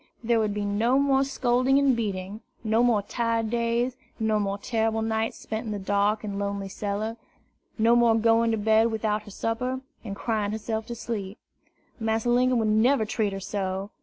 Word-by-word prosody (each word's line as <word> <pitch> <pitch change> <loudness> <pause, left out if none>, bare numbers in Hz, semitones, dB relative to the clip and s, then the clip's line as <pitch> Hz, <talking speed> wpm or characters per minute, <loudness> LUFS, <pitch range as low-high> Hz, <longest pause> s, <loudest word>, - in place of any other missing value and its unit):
There 230 0 +2
would 210 -2 0
be 205 0 -2
no 220 +6 +2
more 275 -1 +3
scolding 260 0 +2
and 280 -2 +4
beating, 200 -2 -4 0.2
no 220 +1 +2
more 235 -4 +3
tired 230 0 -1
days, 235 +1 0 0.2
no 220 -1 +1
more 200 -1 -1
terrible 225 0 -1
nights 220 0 -1
spent 220 +1 -5
in - - -3
the 210 - -2
dark 205 +2 +1
and 200 -1 -4
lonely 200 -1 -3
cellar, 210 +3 -3 0.6
no 230 +1 +4
more 235 -2 +5
going 230 +1 +3
to 225 - +1
bed 220 +2 +3
without 215 -1 -1
her 210 - -13
supper, 250 +5 -2 0.2
and 200 -4 -5
crying 210 -1 -1
herself 220 0 -3
to 235 - -5
sleep. 215 -3 -5 0.6
Massa 225 +1 0
Linkum 250 +1 +3
would 220 -2 +1
never 220 +3 +3
treat 210 -1 -1
her 195 - -4
so. 195 0 -3
220 Hz, 185 wpm, -26 LUFS, 205-235 Hz, 0.6 s, more